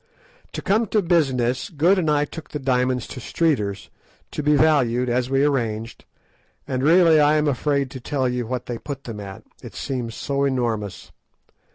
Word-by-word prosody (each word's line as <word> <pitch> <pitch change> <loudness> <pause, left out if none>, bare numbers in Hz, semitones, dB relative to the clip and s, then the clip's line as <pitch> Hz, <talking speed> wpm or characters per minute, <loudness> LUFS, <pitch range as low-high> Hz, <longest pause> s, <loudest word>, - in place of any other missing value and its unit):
To - - -5
come 215 +3 +2
to 210 0 +1
business, 130 -7 +1
Good 175 +5 +3
and 160 -4 0
I 150 0 +2
took 160 +1 -10
the - - -4
diamonds 125 -2 0
to - - -8
Streeter's 115 - -1 0.4
to - - -3
be 150 0 +3
valued, 130 -5 +3
as 125 +1 0
we 135 +1 +2
arranged, 115 -6 -2 0.6
and 130 -1 -2
really 165 +1 +5
I 150 +1 +4
am 150 0 +2
afraid 140 -1 0
to 130 - -7
tell 130 +1 -1
you 125 -2 -2
what 125 0 -3
they 120 -2 -5
put 140 -2 -7
them 115 -3 -7
at, 95 -1 -9 0.2
it - - -11
seems 120 -4 -4
so 140 0 -2
enormous. 115 -8 -2
135 Hz, 180 wpm, -22 LUFS, 120-150 Hz, 0.6 s, really